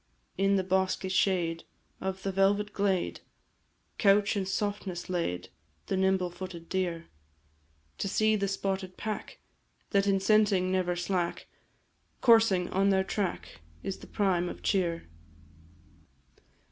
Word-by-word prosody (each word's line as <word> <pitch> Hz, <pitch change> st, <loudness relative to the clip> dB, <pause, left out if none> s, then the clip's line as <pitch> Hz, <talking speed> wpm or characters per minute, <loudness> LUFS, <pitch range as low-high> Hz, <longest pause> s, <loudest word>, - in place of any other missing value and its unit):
In 195 Hz, +1 st, +2 dB
the 190 Hz, -, +1 dB
bosky 190 Hz, 0 st, 0 dB
shade 175 Hz, -3 st, +1 dB, 0.4 s
Of 190 Hz, 0 st, -4 dB
the 195 Hz, -, -1 dB
velvet 200 Hz, +2 st, +2 dB
glade, 195 Hz, -3 st, 0 dB, 0.8 s
Couch, 200 Hz, 0 st, +4 dB
in 195 Hz, -2 st, -1 dB
softness 195 Hz, -3 st, -3 dB
laid, 170 Hz, -, -2 dB, 0.4 s
The -, -, -1 dB
nimble 190 Hz, -1 st, +1 dB
footed 175 Hz, -2 st, -8 dB
deer; 175 Hz, -3 st, -1 dB, 0.9 s
To -, -, -1 dB
see 215 Hz, +2 st, +2 dB
the 200 Hz, -1 st, 0 dB
spotted 195 Hz, -1 st, -3 dB
pack, 215 Hz, -1 st, -5 dB, 0.5 s
That 200 Hz, -1 st, +3 dB
in 195 Hz, -1 st, +3 dB
scenting 195 Hz, -2 st, +3 dB
never 180 Hz, -1 st, +1 dB
slack, 175 Hz, -1 st, -2 dB, 0.7 s
Coursing 225 Hz, -7 st, +5 dB
on 195 Hz, +1 st, +2 dB
their 190 Hz, -1 st, +3 dB
track, 180 Hz, -, -3 dB, 0.2 s
Is 195 Hz, -, -4 dB
the -, -, -12 dB
prime 180 Hz, -4 st, +1 dB
of -, -, -9 dB
cheer. 170 Hz, -4 st, 0 dB
190 Hz, 125 wpm, -29 LUFS, 180-200 Hz, 0.9 s, Coursing